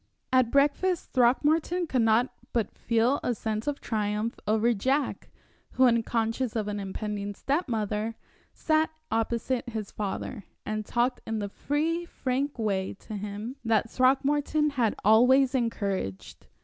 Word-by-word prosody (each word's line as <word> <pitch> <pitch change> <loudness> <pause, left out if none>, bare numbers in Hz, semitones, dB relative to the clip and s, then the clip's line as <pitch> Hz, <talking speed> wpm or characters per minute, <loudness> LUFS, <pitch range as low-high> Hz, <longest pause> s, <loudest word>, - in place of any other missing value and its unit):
At 255 -2 +4
breakfast, 295 +7 +1
Throckmorton 305 +8 +3
could 260 -6 +1
not 225 +3 +3 0.2
but 230 -3 -1
feel 235 +4 +1
a 245 - 0
sense 220 +2 -3
of 290 -1 -1
triumph 210 0 -2
over 220 +3 +3
Jack, 265 +7 -1 0.4
who, 260 - +4
unconscious 230 0 +1
of 215 -2 -1
an 205 0 -3
impending 205 +1 -4
step 290 - -1
mother, 215 0 -1 0.4
sat 315 0 +1 0.2
opposite 235 +2 -1
his 215 -3 -5
father, 210 +2 -4 0.2
and 215 0 -3
talked 245 +1 0
in 225 - -1
the 205 -1 -3
free, 315 +9 -1
frank 275 -2 -2
way 195 -5 -1
to 215 - -9
him 210 +5 -5
that 225 -1 +1
Throckmorton 290 +3 +2
had 240 -6 +1
always 250 +5 +5
encouraged. 200 - -3
235 Hz, 135 wpm, -28 LUFS, 215-270 Hz, 0.4 s, always